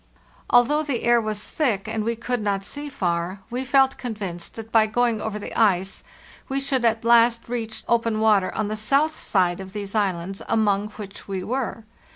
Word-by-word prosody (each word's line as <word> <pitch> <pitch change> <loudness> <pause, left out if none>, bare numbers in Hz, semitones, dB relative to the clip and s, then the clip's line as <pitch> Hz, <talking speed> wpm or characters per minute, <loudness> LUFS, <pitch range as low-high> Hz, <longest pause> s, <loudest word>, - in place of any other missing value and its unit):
Although 250 +5 +4
the 280 -6 -2
air 240 0 +4
was 215 -1 -3
thick 225 -10 0
and 220 0 -2
we 230 +2 -1
could 240 +1 -2
not 200 -2 -1
see 290 +8 -6
far, 180 -5 -2
we 250 +2 -2
felt 270 0 +3
convinced 200 -8 -5
that 225 0 -8
by 220 -1 +5
going 235 0 +1
over 215 -1 -3
the 210 - -7
ice 195 -4 +1 0.5
we 270 +1 0
should 270 -2 0
at 225 -1 +1
last 235 0 +4
reach 230 -2 -4
open 230 -2 +1
water 210 -4 +3
on 215 - -1
the 215 - -2
south 280 +8 +1
side 180 -3 +1
of 190 0 -9
these 200 -2 -5
islands 195 -3 -1
among 210 -2 +2
which 205 -2 -9
we 190 -2 -3
were. 245 -1 -3
220 Hz, 190 wpm, -24 LUFS, 200-245 Hz, 0.5 s, by